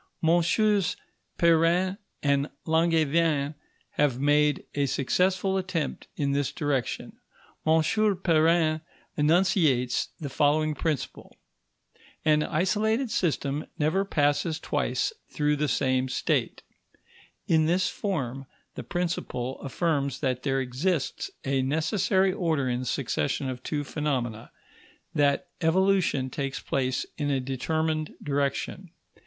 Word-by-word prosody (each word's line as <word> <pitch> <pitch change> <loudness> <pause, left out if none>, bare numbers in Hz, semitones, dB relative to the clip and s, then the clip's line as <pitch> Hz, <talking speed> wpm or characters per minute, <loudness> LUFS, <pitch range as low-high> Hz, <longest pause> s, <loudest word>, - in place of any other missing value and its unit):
MM. 175 +3 +3 0.4
Perrin 170 +3 +3 0.2
and 140 0 +2 0.2
Langevin 160 -2 +2 0.4
have 140 -4 +1
made 145 +1 +3
a 140 -1 +1
successful 185 +8 +1
attempt 185 -4 -3
in 140 -1 0
this 140 -1 0
direction. 140 -5 -2 0.5
M. 160 0 +5 0.4
Perrin 160 -1 +3 0.3
enunciates 150 -6 +2
the 150 - -4
following 150 +2 +2
principle: 150 -3 -4 0.9
An 155 -1 +4
isolated 215 - 0
system 150 -5 -1
never 160 +5 +1
passes 150 -2 +1
twice - - -1 0.2
through 150 0 +1
the 150 +1 0
same 130 -2 +1
state. - - -1 0.8
In 160 -1 +3
this 180 +3 +2
form, 135 - -3 0.3
the - - -6
principle 165 -8 -3
affirms 140 -2 -1
that 130 -3 0
there 135 0 0
exists 135 +4 -1 0.2
a 135 -1 +1
necessary 185 +7 +1
order 160 -8 0
in 125 -1 0
the 130 - -4
succession 135 +2 -1
of 125 -1 -5
two 145 +2 -2
phenomena; 130 -7 -3 0.6
that 145 -1 +2
evolution 170 -6 +2
takes 135 0 -3
place 130 -1 -1
in 145 -1 0
a 135 -2 +1
determined 155 +4 -2
direction. 145 +6 -2
150 Hz, 110 wpm, -27 LUFS, 140-170 Hz, 0.9 s, M